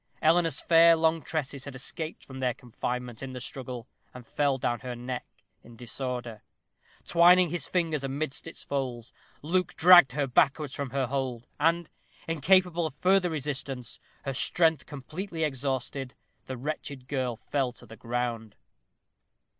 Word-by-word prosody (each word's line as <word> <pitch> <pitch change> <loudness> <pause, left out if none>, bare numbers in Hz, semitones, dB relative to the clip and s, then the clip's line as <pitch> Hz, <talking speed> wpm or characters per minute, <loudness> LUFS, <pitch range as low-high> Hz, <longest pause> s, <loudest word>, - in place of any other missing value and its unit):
Eleanor's 165 -1 +3
fair 165 0 +7
long 160 0 +2
tresses 140 -3 -4
had 140 -2 -8
escaped 155 +5 -6
from 130 -1 -9
their 125 -3 0
confinement 125 0 -5
in 135 -1 -6
the 125 - -5
struggle, 125 -2 -5 0.3
and 125 -1 -10
fell 140 +2 +1
down 120 -2 -1
her 125 -1 -6
neck 125 +1 -5 0.4
in 120 - -14
disorder. 120 -1 -5 0.6
Twining 175 0 +6
his 175 -1 -2
fingers 165 -5 0
amidst 135 +1 -3
its - - -8
folds, 125 -4 -4 0.3
Luke 180 +4 0
dragged 175 -6 +8
her 145 0 0
backwards 140 +2 +2
from 140 -2 -3
her 135 +1 0
hold, 125 -2 -3
and, 165 +2 +2 0.4
incapable 170 +1 +3
of 145 - -10
further 185 +2 +3
resistance, 135 -5 -3 0.3
her 135 - -2
strength 160 +2 +2
completely 160 +5 -5
exhausted, 135 -2 -2 0.3
the 130 - -5
wretched 140 -1 -5
girl 130 -4 -1
fell 135 +2 -1
to 120 - -14
the 115 0 -12
ground. 115 -2 -3
135 Hz, 145 wpm, -28 LUFS, 125-160 Hz, 0.6 s, dragged